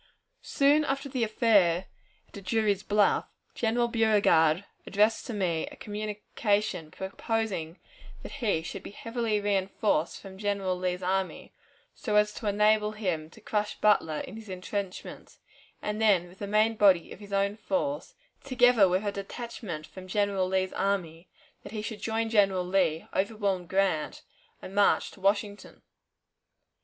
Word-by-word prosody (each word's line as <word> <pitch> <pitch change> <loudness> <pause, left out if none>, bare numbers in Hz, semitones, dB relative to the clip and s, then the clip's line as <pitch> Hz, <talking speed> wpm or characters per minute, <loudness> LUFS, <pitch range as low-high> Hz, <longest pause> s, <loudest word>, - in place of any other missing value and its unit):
Soon 290 +2 +3
after 275 0 -2
the 255 -3 -1
affair 200 -6 +3 0.5
at 200 - -9
Drury's 205 0 +1
Bluff, 205 0 +2 0.3
General 235 +1 +1
Beauregard 205 -7 +3 0.2
addressed 215 +5 +2
to - - -4
me 170 -5 -1
a - - -10
communication, 210 -4 -2
proposing 190 -3 -3 0.5
that - - -8
he 220 - -1
should - - -6
be - - -9
heavily 230 +1 -2
reinforced 195 -4 0
from 190 -1 -11
General 200 -3 -1
Lee's 180 0 -2
army, 190 +1 -2 0.4
so 210 -3 -3
as 210 0 +4
to 215 - -5
enable 210 +1 +3
him 180 -7 -2
to 200 - -16
crush 210 -1 -2
Butler 160 -7 +3
in 215 - -8
his 220 -2 -11
intrenchments, 185 +1 -6 0.5
and 210 +1 -2
then, 195 -5 +4
with 180 +3 -17
the 200 - -4
main 215 +2 +2
body 190 -5 +4
of - - -9
his 205 -1 -12
own 200 +1 +1
force, 285 - -2 0.3
together 245 -6 +5
with 185 +3 0
a 205 - 0
detachment 200 -5 -6
from 185 +2 -11
General 200 -1 +1
Lee's 190 0 0
army, 180 -4 -2 0.3
that - - -11
he 215 -1 -4
should 220 -1 -6
join 225 0 -1
General 195 -4 +3
Lee, 180 -4 +1
overwhelm 200 -3 -1
Grant, 190 -5 0 0.4
and 190 - -8
march 200 0 +3
to 195 - -16
Washington. 205 +1 -1
205 Hz, 150 wpm, -28 LUFS, 185-220 Hz, 0.5 s, together